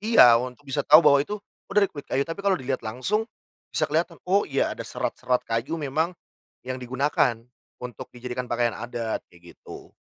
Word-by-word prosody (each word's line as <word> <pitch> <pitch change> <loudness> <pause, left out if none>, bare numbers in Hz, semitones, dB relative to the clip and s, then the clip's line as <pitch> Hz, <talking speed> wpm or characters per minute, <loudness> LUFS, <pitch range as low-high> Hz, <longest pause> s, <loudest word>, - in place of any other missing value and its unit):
iya, 195 - +7
untuk 125 -1 -7
bisa 140 +1 -1
tahu 155 +2 +8
bahwa 140 -2 +6
itu, 210 +9 -3 0.3
"Oh - - -8
dari 200 -2 +4
kulit 145 -2 -9
kayu," 135 +1 +1
tapi 165 +4 -6
kalo 195 -2 +2
dilihat 130 0 -3
langsung 130 - -1 0.4
bisa - - +1
kelihatan, - - -1
"Oh 195 +3 +2
iya 135 - +1
ada - - -9
serat-serat 125 -1 -1
kayu 115 +7 -2
memang 160 +4 -1 0.5
yang 130 0 -4
digunakan 125 -1 +1 0.5
untuk 125 -1 -7
dijadikan 125 +1 -5
pakaian 120 -1 +1
adat," 120 -1 -3
kayak 85 0 -16
gitu - - -11
130 Hz, 180 wpm, -25 LUFS, 120-160 Hz, 0.5 s, tahu